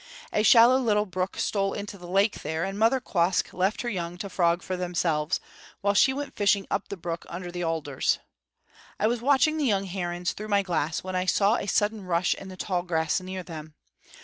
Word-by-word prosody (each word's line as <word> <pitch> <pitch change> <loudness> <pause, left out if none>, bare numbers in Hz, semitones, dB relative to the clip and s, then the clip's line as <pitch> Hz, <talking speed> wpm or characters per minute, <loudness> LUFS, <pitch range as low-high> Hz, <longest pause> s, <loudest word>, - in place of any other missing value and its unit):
A 210 - +2
shallow 235 +3 +7
little 210 -4 +2
brook 185 0 -3
stole 195 -1 0
into 205 0 -6
the 175 -2 -11
lake 195 +4 +1
there, 160 +1 -2
and 195 +1 -4
Mother 230 +4 +4
Quoskh 180 -6 0
left 190 +6 0
her - - -4
young 175 -4 -4
to 195 +1 -6
frog 170 0 +2
for 185 - -3
themselves, 170 -3 0 0.4
while 200 0 +2
she 265 - +5
went 285 +2 -5
fishing 200 -1 +2
up 200 - -1
the 200 - -6
brook 170 -1 -4
under 175 0 -6
the 175 0 -4
alders. 160 -5 0 0.8
I - - +1
was 230 +1 +1
watching 285 +4 +3
the 300 - 0
young 200 -5 +2
herons 175 -1 -3
through 215 - -7
my 200 -1 +2
glass 165 -4 -1
when 185 0 -4
I 185 0 0
saw 205 +4 +3
a - - -4
sudden 210 +1 +1
rush 180 0 +1
in 195 - -10
the 185 - -10
tall 180 -1 -1
grass 165 -1 0
near 185 0 -6
them. 155 -3 -9
190 Hz, 210 wpm, -26 LUFS, 175-210 Hz, 0.8 s, shallow